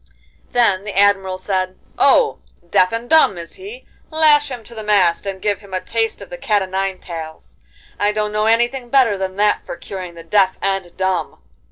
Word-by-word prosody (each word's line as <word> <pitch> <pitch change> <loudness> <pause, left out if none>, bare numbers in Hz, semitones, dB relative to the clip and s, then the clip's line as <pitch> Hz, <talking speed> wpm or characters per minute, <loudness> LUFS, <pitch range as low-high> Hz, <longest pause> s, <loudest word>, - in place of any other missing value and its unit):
Then 205 -6 +2
the 205 -2 -6
Admiral 195 -2 +3
said: 185 -1 -2 0.2
'Oh! 465 -3 +4 0.3
deaf 180 +1 +3
and 230 +1 -4
dumb 315 - +4
is 170 -1 -9
he? 420 +6 -10 0.2
Lash 305 -2 +4
him 245 -3 -7
to 235 - -13
the 220 - -7
mast 200 -3 +2
and 195 -1 -4
give 205 0 -1
him 195 -2 -8
a - - 0
taste 225 +3 -2
of - - -15
the 265 - -7
cat 210 -5 +1
o' - - -3
nine 190 0 -2
tails. 160 -3 -9 0.4
I 205 0 +2
don't 210 0 -2
know 215 +1 0
anything 240 +2 +1
better 250 -5 +4
than 190 -1 -4
that 210 +1 +2
for - - -7
curing 180 0 -8
the 165 - -10
deaf 190 +2 +2
and 195 -3 -2
dumb! 190 -1 -1
200 Hz, 200 wpm, -19 LUFS, 185-230 Hz, 0.4 s, Oh